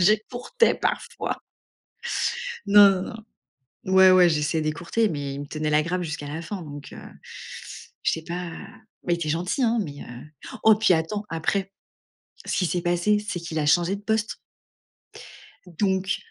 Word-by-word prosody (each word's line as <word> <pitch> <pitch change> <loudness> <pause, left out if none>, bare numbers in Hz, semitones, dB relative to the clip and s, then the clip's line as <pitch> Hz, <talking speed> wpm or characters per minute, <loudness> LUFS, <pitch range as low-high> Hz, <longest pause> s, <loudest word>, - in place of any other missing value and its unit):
j'écourtais 245 - +2
parfois. - - -2 1.3
Non, 205 0 +8
non, - - -6 0.7
non, 185 - -3
ouais, 190 0 +8
ouais, 180 -1 +7
j'essayais 155 0 0
d'écourter, 170 +9 0
mais 140 -5 -4
il 140 - -6
me 145 - -6
tenait 155 +1 -3
la 150 +1 +4
grape 180 +3 -2
jusqu'à 150 -3 -5
la 160 +3 -5
fin, 185 +1 -6
donc 145 -2 -9
heu, - - -10 1.0
je - - +2
sais 160 - -3
pas, 175 0 -4 0.5
mais 175 - +2
il - - -2
était 165 -3 -3
gentil 180 - -1
hein, 235 0 +2
mais 145 -4 -8
heu, 120 +1 -10 0.4
oh 220 - +8
puis 215 -4 +4
attends. 185 +6 -2
Après, 190 +4 -1 0.7
ce - - -2
qui 185 - +2
s'est 175 +1 -1
passé, 175 +4 +2
c'est 175 - -3
qu'il 160 -1 -4
a 150 - 0
changé 175 +5 +3
de 205 - -13
poste 220 0 -1 1.3
donc 190 +2 0
175 Hz, 165 wpm, -25 LUFS, 155-200 Hz, 1.3 s, Non